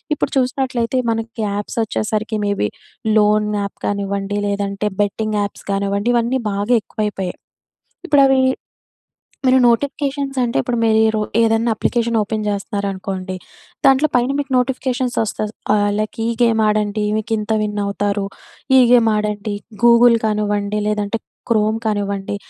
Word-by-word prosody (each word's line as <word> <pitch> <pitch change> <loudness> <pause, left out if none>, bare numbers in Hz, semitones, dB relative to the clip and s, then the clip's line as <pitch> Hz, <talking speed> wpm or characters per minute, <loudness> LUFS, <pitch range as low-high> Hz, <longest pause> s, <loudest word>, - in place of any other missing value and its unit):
ఇప్పుడు - - -2
చూసినట్లయితే 255 -1 0
మనకి 225 0 -4
యాప్సొచ్చేసరికి 215 +1 -2
మేబీ 200 - 0 0.5
లోన్ 210 0 +3
యాప్ 200 - -6
కానివ్వండి. 200 0 -2
లేదంటే 200 0 -2 0.2
బెట్టింగ్ 215 +1 -1
యాప్స్ 200 0 -5
కానివ్వండి. 200 +2 0
ఇవన్నీ 240 +2 +1
బాగా 205 +5 0
ఎక్కువైపోయాయి. 205 -5 -3 0.7
ఇప్పుడవీ 275 -3 +5 1.1
మీరు 260 0 +5
నోటిఫికేషన్స్ 275 +3 0
అంటే 240 -1 -1
ఇప్పుడు 240 - -2
మీరీ 220 0 +4
రో - - +1 0.2
ఏదన్నా 225 +1 +2
అప్లికేషన్ 235 +1 0
ఓపెన్ 215 +1 -2
చేస్తనారనుకోండి. 195 -2 -3 0.5
దాంట్లో 270 +3 +5
పైన 245 +2 +1
మీకు 285 -1 -3
నోటిఫికేషన్స్ 255 -1 -1
వస్తది. 215 0 -3 0.2
ఆహ్, 205 -1 +2
లైక్ 215 0 -3
ఈ - - 0
గేమాడండి. 215 -2 +2
మీకింత 220 0 -2
విన్ 210 0 -2
అవుతారు. 200 0 -1 0.5
ఈ - - +8
గేమాడండి. 210 -3 +2 0.3
గూగుల్ 235 0 +6
కానివ్వండి. 210 -1 0
లేదంటే 210 +1 -1 0.3
క్రోమ్ 215 -1 +2
కానివ్వండి. 200 -2 -2
215 Hz, 120 wpm, -19 LUFS, 205-235 Hz, 1.1 s, ఈ